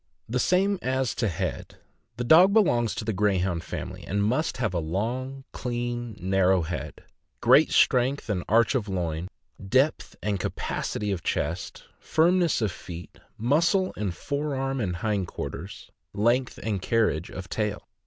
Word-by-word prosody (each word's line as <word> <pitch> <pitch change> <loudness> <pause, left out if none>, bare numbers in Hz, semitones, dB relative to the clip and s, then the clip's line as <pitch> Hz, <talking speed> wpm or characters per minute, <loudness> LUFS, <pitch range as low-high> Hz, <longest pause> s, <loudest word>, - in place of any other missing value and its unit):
The 125 +3 -1
same 195 +6 +2
as 130 -1 0
to 115 - 0
head. 85 - -4 0.4
The 120 - -2
dog 175 +10 +7
belongs 120 - +3
to - - -4
the 110 - 0
Greyhound 95 -4 +1
family, - - -6
and 100 +2 -1
must 130 +9 0
have 110 -7 -1
a 85 - 0
long, 120 +11 -3
clean, 120 -2 -4
narrow 95 -1 +2
head; 85 +3 -6 0.4
great - - +6
strength 130 +3 +3
and 95 -5 -1
arch 115 +4 +4
of 115 -6 -1
loin; 85 -2 -2 0.4
depth 130 +9 +1
and 105 -2 0
capacity 105 +3 -3
of 95 -4 -2
chest; 80 +5 -3 0.2
firmness 170 -4 +2
of 105 - +1
feet; 85 0 -10 0.2
muscle 170 - +2
in 105 - -2
the - - -1
fore 145 - -3
arm 135 0 -1
and 90 -5 -1
hind 100 -1 -1
quarters; 90 +4 -7 0.2
length 120 +5 +1
and 105 -4 -1
carriage 105 -7 +1
of 95 -1 -7
tail. 105 0 -3
110 Hz, 155 wpm, -26 LUFS, 95-130 Hz, 0.4 s, dog